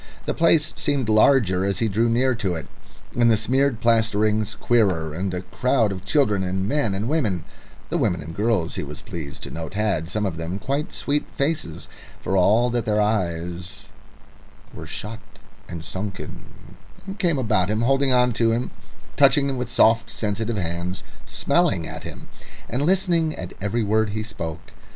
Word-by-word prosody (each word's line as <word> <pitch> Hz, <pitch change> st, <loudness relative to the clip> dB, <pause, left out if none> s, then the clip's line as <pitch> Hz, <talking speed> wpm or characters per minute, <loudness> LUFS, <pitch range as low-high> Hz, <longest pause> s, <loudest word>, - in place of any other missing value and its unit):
The -, -, -1 dB
place 165 Hz, -2 st, +3 dB
seemed 140 Hz, -6 st, 0 dB
larger 110 Hz, -4 st, +4 dB
as 100 Hz, -1 st, 0 dB
he 115 Hz, -, +1 dB
drew 110 Hz, +3 st, +1 dB
near 130 Hz, +3 st, +2 dB
to 100 Hz, -7 st, -2 dB
it, 80 Hz, -3 st, -5 dB, 0.5 s
and 120 Hz, -1 st, +4 dB
the 110 Hz, -, +4 dB
smeared 130 Hz, +2 st, +1 dB
plasterings 110 Hz, -2 st, +2 dB
queerer, 95 Hz, -9 st, +1 dB
and 95 Hz, +4 st, -2 dB
a 90 Hz, 0 st, -3 dB
crowd 125 Hz, -1 st, +1 dB
of 95 Hz, 0 st, -6 dB
children 105 Hz, -3 st, +2 dB
and 95 Hz, +1 st, -1 dB
men 115 Hz, -7 st, 0 dB
and 105 Hz, +4 st, -2 dB
women 110 Hz, -, 0 dB, 0.5 s
(the -, -, +1 dB
women 85 Hz, -, +1 dB
and 80 Hz, +3 st, -8 dB
girls, 105 Hz, -5 st, 0 dB
he -, -, -3 dB
was -, -, -8 dB
pleased 75 Hz, -5 st, -7 dB
to -, -, -7 dB
note, 80 Hz, +4 st, -6 dB
had 100 Hz, -6 st, 0 dB
some 105 Hz, +3 st, -1 dB
of 90 Hz, -5 st, -3 dB
them 85 Hz, +3 st, -3 dB
quite 140 Hz, +8 st, -2 dB
sweet 145 Hz, +1 st, -1 dB
faces, 140 Hz, -, -2 dB, 0.3 s
for 95 Hz, -, -2 dB
all 110 Hz, +6 st, +4 dB
that 120 Hz, -1 st, 0 dB
their 105 Hz, -1 st, +1 dB
eyes 90 Hz, -4 st, -2 dB, 0.8 s
were 80 Hz, -, -8 dB
shut 105 Hz, +6 st, -6 dB, 0.5 s
and 85 Hz, -1 st, -7 dB
sunken) 95 Hz, +2 st, -6 dB, 0.7 s
came 170 Hz, -5 st, +2 dB
about 105 Hz, -7 st, +1 dB
him, 105 Hz, +1 st, 0 dB
holding 135 Hz, +2 st, +3 dB
on 125 Hz, -1 st, +3 dB
to 115 Hz, 0 st, +2 dB
him, 120 Hz, +2 st, -1 dB, 0.5 s
touching 140 Hz, -1 st, +5 dB
him 135 Hz, -, -2 dB
with 125 Hz, -1 st, -3 dB
soft, 115 Hz, -1 st, +4 dB
sensitive 110 Hz, +1 st, -2 dB
hands, 85 Hz, +1 st, -3 dB, 0.2 s
smelling -, -, +1 dB
at -, -, -8 dB
him, -, -, -9 dB, 0.4 s
and 125 Hz, -, -2 dB
listening 170 Hz, -1 st, +2 dB
at 90 Hz, -, -7 dB
every 110 Hz, +4 st, 0 dB
word 110 Hz, +1 st, +2 dB
he 110 Hz, +1 st, -3 dB
spoke. 85 Hz, -7 st, -7 dB
110 Hz, 175 wpm, -23 LUFS, 95-125 Hz, 0.8 s, touching